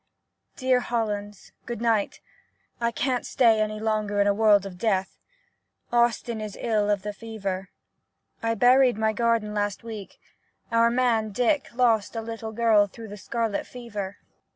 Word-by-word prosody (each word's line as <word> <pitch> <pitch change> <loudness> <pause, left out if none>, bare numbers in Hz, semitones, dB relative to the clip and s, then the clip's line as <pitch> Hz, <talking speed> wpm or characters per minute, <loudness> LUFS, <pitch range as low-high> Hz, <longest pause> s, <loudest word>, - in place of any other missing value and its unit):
Dear 255 -1 +2
Hollands, 210 -4 -3
— - - -43
Good 240 -3 -4
night! 225 -3 0 0.6
I 235 0 +1
can't 250 +1 -1
stay 225 -4 +3
any 215 0 -2
longer 215 -2 -1
in 200 - +4
a 205 - +3
world 205 -2 +4
of 180 -2 -8
death. 195 -3 -1 0.7
Austin 235 -1 +1
is 210 -2 -6
ill 215 -3 +1
of 205 -2 +1
fever. 195 -3 -5 0.7
I 230 0 0
buried 250 +1 +5
my 220 0 +1
garden 230 -2 +1
last 205 0 -2
week 220 -4 -8 0.3
— - - -41
our 230 0 +4
man, 235 -3 +1
Dick, 245 +7 +1
lost 230 -4 +2
a 225 - -2
little 225 0 -6
girl 220 -2 +4
through 225 +2 -11
the 205 - -7
scarlet 225 0 -2
fever. 205 -5 -6
220 Hz, 155 wpm, -25 LUFS, 205-235 Hz, 0.7 s, buried